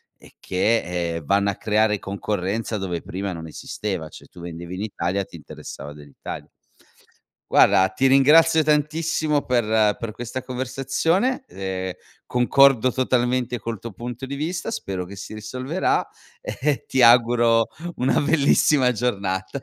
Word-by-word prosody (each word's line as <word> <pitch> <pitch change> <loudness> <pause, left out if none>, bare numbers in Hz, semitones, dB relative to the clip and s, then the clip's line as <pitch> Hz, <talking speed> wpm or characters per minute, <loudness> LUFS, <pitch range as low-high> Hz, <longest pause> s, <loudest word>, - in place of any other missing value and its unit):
e - - -19
che, 90 -4 0
ehm, 85 -2 -6
vanno 100 +4 +2
a 100 - -2
creare 105 +1 +1
concorrenza 100 +2 -3
dove 90 -4 -3
prima 95 +1 -5
non 80 -1 -7
esisteva, 85 +1 -5
cioè - - -14
tu - - -15
vendevi 85 +1 -7
in 95 - -5
Italia, 100 -2 -2
ti - - -14
interessava 75 -1 -9
dell'Italia. 75 -1 -9 1.0
Guarda, 95 0 +5
ti 130 +8 +1
ringrazio 155 +4 +5
tantissimo 150 0 +1
per 110 -4 +2
per 115 -2 -4
questa 120 +3 -5
conversazione, 135 - -1
ehm, 95 -1 -4 0.3
concordo 130 0 +4
totalmente 125 -1 0
col 115 +1 -4
tuo 115 - -7
punto 120 +5 -6
di 135 - -7
vista, 160 +5 -3
spero 95 -2 -4
che 100 +3 -10
si 100 - -8
risolverà 130 - -1 0.3
e 145 +1 -2
ti 130 - +1
auguro 115 -1 +5 0.3
una 130 - +2
bellissima 145 -3 +3
giornata. 100 -1 -2
115 Hz, 140 wpm, -23 LUFS, 95-130 Hz, 1.0 s, Guarda